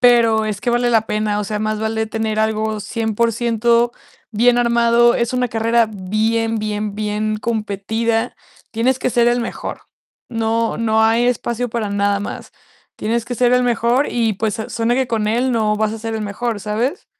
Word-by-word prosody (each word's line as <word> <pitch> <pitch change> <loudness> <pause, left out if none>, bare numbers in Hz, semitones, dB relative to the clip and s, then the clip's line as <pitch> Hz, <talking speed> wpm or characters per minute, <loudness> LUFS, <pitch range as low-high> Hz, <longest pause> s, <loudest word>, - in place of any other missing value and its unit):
pero 230 -3 +5
es 210 -2 -3
que 245 - 0
vale 240 0 +2
la 225 -2 +4
pena. 210 -1 -1
O 210 - -2
sea, 210 +1 -3
más 215 0 -1
vale 220 0 -1
tener 220 0 -2
algo 220 0 -1
100% 235 +1 +1 0.4
bien 240 +3 +3
armado. 235 0 +4
Es 235 0 0
una 250 0 +1
carrera 230 +1 +2
bien, 220 +3 -1
bien, 210 -1 -3
bien 215 0 -1
competida. 225 +1 -1 0.4
Tienes 245 +3 +1
que - - 0
ser 240 0 +3
el 240 0 +1
mejor. 230 - -5 0.5
No, 230 0 -1
no 220 -1 +2
hay 230 +2 +3
espacio 245 0 -1
para 225 -2 -2
nada 200 0 +1
más, 205 - -7 0.4
tienes 230 +1 -1
que 245 +1 -4
ser 245 +1 +3
el 250 0 +4
mejor. 240 +3 +1
Y 230 -2 +1
pues, 215 +2 -2
suena 230 +1 0
que 265 -1 +1
con 220 -3 -1
él 245 +3 +1
no 215 -2 +1
vas 215 0 0
a 225 - -5
ser 225 0 -4
el 220 - -3
mejor, 210 +2 -3
¿sabes? 230 - -2
225 Hz, 180 wpm, -19 LUFS, 215-235 Hz, 0.5 s, pero